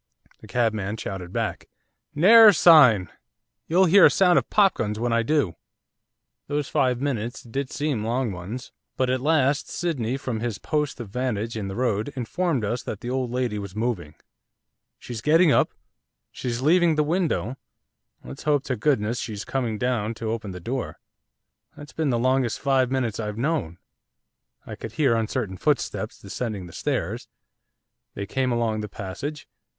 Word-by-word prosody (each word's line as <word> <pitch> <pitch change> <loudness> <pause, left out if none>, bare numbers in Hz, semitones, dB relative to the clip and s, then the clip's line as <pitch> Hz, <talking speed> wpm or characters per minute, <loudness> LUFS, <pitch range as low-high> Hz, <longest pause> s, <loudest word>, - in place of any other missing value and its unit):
The - - -14
cabman 110 -3 -1
shouted 95 -4 -6
back. - - -3 0.5
'Ne'er 220 +9 +8
a 210 - +8
sign, 125 - +6 0.6
you'll 180 +4 +4
hear 190 +3 +7
a - - +3
sound 180 -2 +4
of - - -9
popguns 150 - +2
when 120 +1 -1
I 115 - +3
do.' 120 - 0 0.9
Those 145 -1 -2
five 125 -2 +1
minutes 125 -3 -3
did 135 +3 -4
seem 145 -7 -2
long 120 +1 -1
ones. 95 +7 -7 0.3
But 130 -1 +1
at 130 0 0
last 145 -1 +2
Sydney, 135 -8 -2
from 125 -4 -4
his 115 -2 -3
post 150 -4 -2
of 115 -4 -7
vantage 115 -1 -2
in 105 -3 -4
the 95 - -5
road, 115 0 -1
informed 135 0 -1
us 120 +4 -2
that 110 - -6
the 120 - -4
old 130 -1 -1
lady 120 -3 -2
was 100 -1 -8
moving. 105 -9 -3 0.8
'She's 120 -3 -7
getting 160 +4 +4
up; - - +3 0.6
she's 120 -1 -4
leaving 170 +2 +4
the 150 - +2
window; 160 - -1 0.7
let's 65 +2 -9
hope 145 -2 +1
to 135 -3 -2
goodness 115 -2 0
she's 110 -3 -5
coming 120 -5 -2
down 115 -2 -1
to 110 0 -3
open 110 -3 -4
the 90 -1 -7
door. 125 +8 -4 0.8
That's 145 -2 -11
been 160 -3 -1
the 120 - +1
longest 130 0 +1
five 135 -3 +2
minutes 125 -5 -1
I've 105 -1 -4
known.' 125 - -1 0.9
I - - -7
could 115 - -8
hear 140 -6 +2
uncertain 110 -3 -2
footsteps - - -1
descending 110 -7 -5
the 85 - -12
stairs. - - -3 0.9
They 100 - -4
came 130 +4 -1
along 115 -2 0
the 105 - -6
passage. 140 +10 -6
125 Hz, 165 wpm, -24 LUFS, 110-145 Hz, 0.9 s, Ne'er